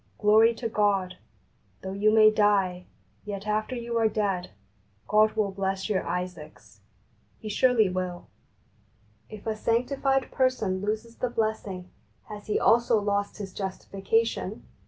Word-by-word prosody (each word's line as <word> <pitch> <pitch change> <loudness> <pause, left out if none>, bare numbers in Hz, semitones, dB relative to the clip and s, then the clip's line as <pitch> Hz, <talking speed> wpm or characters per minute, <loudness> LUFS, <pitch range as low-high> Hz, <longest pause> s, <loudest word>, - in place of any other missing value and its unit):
Glory 220 +2 +5
to 230 0 -3
God! 200 -4 0 0.6
Though 190 - -4
you 200 +2 +2
may 215 0 +6
die, 195 -4 +1 0.4
yet 205 -1 -6
after 215 +4 -1
you 235 -1 -2
are 225 - +4
dead, 200 -4 -1 0.6
God 215 +1 +4
will 215 -3 0
bless 195 0 -3
your 195 -3 +1
Isaacs. 160 - -6 0.6
He 215 - -8
surely 230 0 +3
will 180 -1 -4 1.0
I - - -8
If 205 - -14
a 220 -1 -1
sanctified 265 +4 0
person 220 -8 0
loses 220 +3 -4
the 250 - -1
blessing, 210 -5 -3 0.4
has 210 -1 -9
he 210 - +1
also 235 -1 +4
lost 205 0 -1
his 195 -2 -7
justifica 195 +3 -1
tion 215 -2 -5
210 Hz, 140 wpm, -27 LUFS, 190-225 Hz, 1.0 s, may